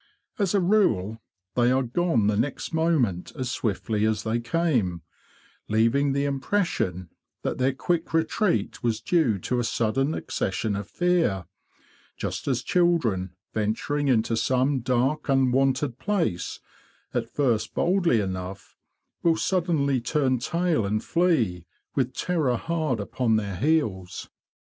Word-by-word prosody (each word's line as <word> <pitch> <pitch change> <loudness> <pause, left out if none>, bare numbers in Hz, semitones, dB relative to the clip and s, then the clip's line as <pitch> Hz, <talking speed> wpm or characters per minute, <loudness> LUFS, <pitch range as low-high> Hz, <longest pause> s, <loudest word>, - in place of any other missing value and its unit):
As 200 -1 +1
a - - +4
rule, 175 - +2 0.3
they 120 +1 +3
are 130 +1 +2
gone 125 - +1
the 105 0 +2
next 125 +9 -2
moment 150 - +1
as 130 -3 -3
swiftly 110 0 -1
as 110 -1 +1
they 115 +1 0
came, 120 - 0 0.6
leaving 115 +6 +2
the 140 +1 0
impression 135 - -1 0.3
that - - -2
their 130 +1 +3
quick 170 +3 -1
retreat 160 - 0
was 115 -2 0
due 125 - +2
to 125 +7 -2
a - - +1
sudden 135 +7 0
accession 100 +2 -2
of 100 0 -5
fear; 170 - +1 0.7
just - - -4
as 130 -3 0
children, 120 - +1 0.2
venturing 115 +7 -1
into 115 -3 +2
some 130 +4 +1
dark 130 +5 0
unwonted 135 0 +2
place, 180 - -1 0.5
at - - -1
first 115 -6 0
boldly 175 - +2
enough, 95 -1 -5 0.5
will 165 -1 +3
suddenly 160 -8 +1
turn 130 -1 +1
tail 170 0 0
and 105 +2 -1
flee, 120 - +1 0.3
with 130 -2 -1
terror 155 -9 0
hard 155 -7 -1
upon 110 +2 0
their 100 -3 -1
heels. 110 - -1
130 Hz, 130 wpm, -25 LUFS, 110-160 Hz, 0.7 s, a